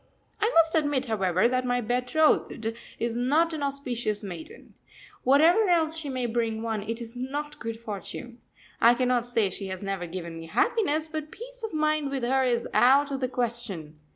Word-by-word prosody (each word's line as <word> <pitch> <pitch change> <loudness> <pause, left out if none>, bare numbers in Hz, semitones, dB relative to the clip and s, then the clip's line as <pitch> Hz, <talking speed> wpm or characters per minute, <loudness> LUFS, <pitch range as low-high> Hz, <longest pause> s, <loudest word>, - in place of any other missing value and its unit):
] - - -32
I 435 - +3
must 330 -1 +5
admit, 290 -5 +1
however, 195 -3 +2
that 255 +1 0
my 245 0 +1
betrothed 245 -1 +1 0.2
is 230 0 -2
not 300 +8 +2
an 310 - -4
auspicious 245 -6 -2
maiden 175 -5 -9 0.5
whatever 330 - +5
else 325 -2 +3
she 320 -3 -4
may 255 -2 -2
bring 225 -1 -1
one, 220 -2 -2
it 225 +3 -4
is 235 0 -5
not 295 +4 -4
good 230 -1 -5
fortune. 230 +3 -7 0.4
I 235 +1 +7
cannot 245 -1 +1
say 225 -5 +1
she 195 +1 -4
has 190 0 -6
never 195 -3 -3
given 170 -1 -6
me 165 - -9
happiness, 385 - +1
but 310 -1 -5
peace - - -9
of 445 - -3
mind 305 -2 +1
with 270 -2 -3
her 265 +2 +2
is 240 -2 +1
out 275 +3 +5
of 270 - -2
the 255 - 0
question. 230 - -4
250 Hz, 185 wpm, -27 LUFS, 225-295 Hz, 0.5 s, I